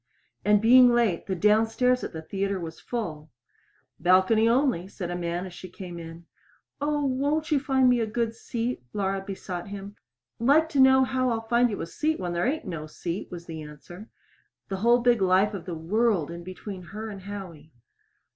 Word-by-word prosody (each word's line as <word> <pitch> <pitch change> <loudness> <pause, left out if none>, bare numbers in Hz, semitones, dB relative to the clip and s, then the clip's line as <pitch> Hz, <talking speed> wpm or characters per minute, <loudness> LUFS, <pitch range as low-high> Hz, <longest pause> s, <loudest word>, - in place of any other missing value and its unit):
And 210 0 +4
being 250 +2 +8
late, 235 -8 +1
the 190 - -1
downstairs 225 +6 +2
at - - -4
the 160 -1 -7
theater 195 +2 -2
was 165 -2 -7
full. 160 -11 -5 0.7
"Balcony 190 +6 +4
only," 240 -8 +1
said 180 -3 -6
a - - -3
man 175 +1 -3
as 185 - -9
she 185 - -10
came 175 -2 -8
in. 165 +1 -10 0.6
"Oh, 295 0 0
won't 285 +5 0
you 295 - +4
find 265 -2 +2
me 245 -1 +4
a 225 - 0
good 230 +1 -1
seat?" 235 +1 -4
Laura 195 -1 -1
besought 190 -2 -6
him. 200 0 -8 0.4
"Like 290 +7 +4
to 290 -4 -1
know 265 0 +7
how 255 -1 0
I'll 225 -1 -2
find 240 +1 +3
you 205 - -4
a - - -2
seat 310 - -1
when 175 -2 -3
there 175 +7 0
ain't 310 +4 -2
no 155 -3 -5
seat," 170 +4 -5
was 170 -1 -8
the 160 -2 -7
answer 155 +7 -11 0.6
the 195 - -2
whole 235 +4 +4
big 240 -3 +3
life 190 +3 +3
of 195 -4 -6
the 175 -2 -4
world 185 0 +1
in 170 0 -8
between 185 +1 -8
her 210 +5 -7
and 195 -2 -9
Howie! 180 -6 -9
205 Hz, 195 wpm, -26 LUFS, 175-245 Hz, 0.7 s, being